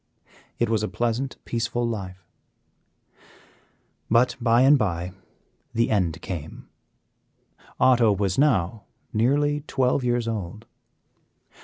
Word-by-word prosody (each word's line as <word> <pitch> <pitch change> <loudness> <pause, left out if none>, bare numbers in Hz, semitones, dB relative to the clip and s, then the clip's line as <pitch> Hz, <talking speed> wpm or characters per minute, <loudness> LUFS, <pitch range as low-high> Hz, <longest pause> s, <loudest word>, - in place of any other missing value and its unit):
It 120 - +1
was 110 -1 0
a 110 - -1
pleasant, 120 +6 -2
peaceful 115 +1 -1
life, 95 -5 -6 1.8
but 120 +3 +3
by 120 0 +4
and 140 +2 +7
by 90 -7 -1 0.6
the 115 +1 +1
end 90 -6 0
came. 80 -4 -7 1.1
Otto 120 -4 +5
was 100 -2 0
now 110 - +1 0.3
nearly 145 +6 +1
twelve 130 0 +1
years 120 -1 0
old. 105 -1 -5
115 Hz, 105 wpm, -24 LUFS, 95-125 Hz, 1.8 s, and